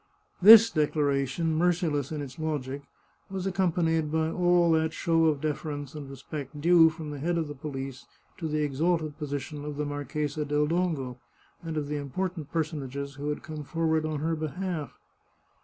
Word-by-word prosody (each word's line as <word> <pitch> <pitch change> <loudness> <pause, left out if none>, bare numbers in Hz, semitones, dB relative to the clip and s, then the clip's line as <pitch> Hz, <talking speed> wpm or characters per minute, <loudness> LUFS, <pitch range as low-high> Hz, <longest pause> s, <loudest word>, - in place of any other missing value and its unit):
This 225 +3 +10
declaration, 150 - +1
merciless 160 -4 +1
in 150 -2 -3
its 140 +4 -9
logic, 145 -3 -3 0.5
was 190 -1 -4
accompanied 165 -4 +1
by 160 0 +1
all 175 -1 +3
that 160 0 +2
show 165 -1 +2
of 150 -3 +2
deference 145 -2 -3
and 145 -3 -7
respect 140 +1 -7
due 165 +1 +6
from 160 -2 -7
the 145 - -6
head 170 +4 0
of 160 -2 -1
the 145 - -6
police 135 -2 -6 0.3
to 165 - -2
the 155 0 0
exalted 155 +2 0
position 145 0 -4
of 150 -1 -5
the 150 - -1
Marchesa 145 +1 -3
del 150 0 +1
Dongo 150 -7 -1 0.4
and 165 -2 -5
of 145 -1 -2
the 150 0 -2
important 160 +2 -4
personages 140 -4 -3
who 145 +2 -4
had 150 - -3
come 155 -2 -6
forward 160 0 0
on 155 -2 -2
her 165 +1 0
behalf. 160 -1 -4
155 Hz, 170 wpm, -28 LUFS, 145-165 Hz, 0.5 s, This